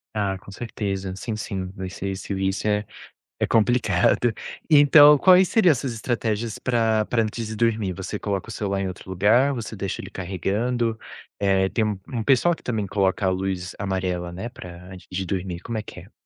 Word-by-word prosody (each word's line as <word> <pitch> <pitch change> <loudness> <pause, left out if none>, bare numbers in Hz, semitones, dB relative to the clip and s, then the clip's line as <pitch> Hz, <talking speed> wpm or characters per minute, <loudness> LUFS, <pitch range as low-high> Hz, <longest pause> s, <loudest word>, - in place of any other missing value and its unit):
Ah, 100 -2 -1
com 100 - -13
certeza. 100 -3 -4
Sim, 110 +3 -4
sim, 95 -3 -4
vencer 95 +1 -5
esse 95 +1 -5
vicio 95 +2 -1
é 105 0 0 0.5
é - - +1
complicado. 115 -1 +2 0.4
Então 145 0 +8
quais 185 +3 +6
seriam 200 -7 +5
essas 130 -2 -2
estratégias 115 -1 -2
pra 115 -3 +1
pra 115 0 +1
antes 110 +1 -4
de 110 - -5
dormir? 110 -4 +1
Você 95 +3 -5
coloca 100 0 -3
o - - -7
celular 100 -2 -2
em 95 - -1
outro 95 0 -8
lugar? 110 +9 +3
Você 115 -3 -5
deixa 100 -2 -4
ele - - -9
carregando? 110 +6 -2 0.4
Eh, 95 -1 +2
tem 110 - 0
um 105 -3 -2
um 115 -3 -1
pessoal 140 +8 +4
que - - -21
também 110 -5 -2
coloca 95 +1 0
a - - +3
luz 95 -1 -3
amarela, 95 -3 -2
né, 95 +7 -5
pra 90 -6 -11
antes 95 -1 -12
de 95 +1 -2
dormir, 90 -1 -3
como 115 +4 -5
é - - -1
que - - -10
é? - - -17
105 Hz, 190 wpm, -24 LUFS, 95-115 Hz, 0.5 s, Então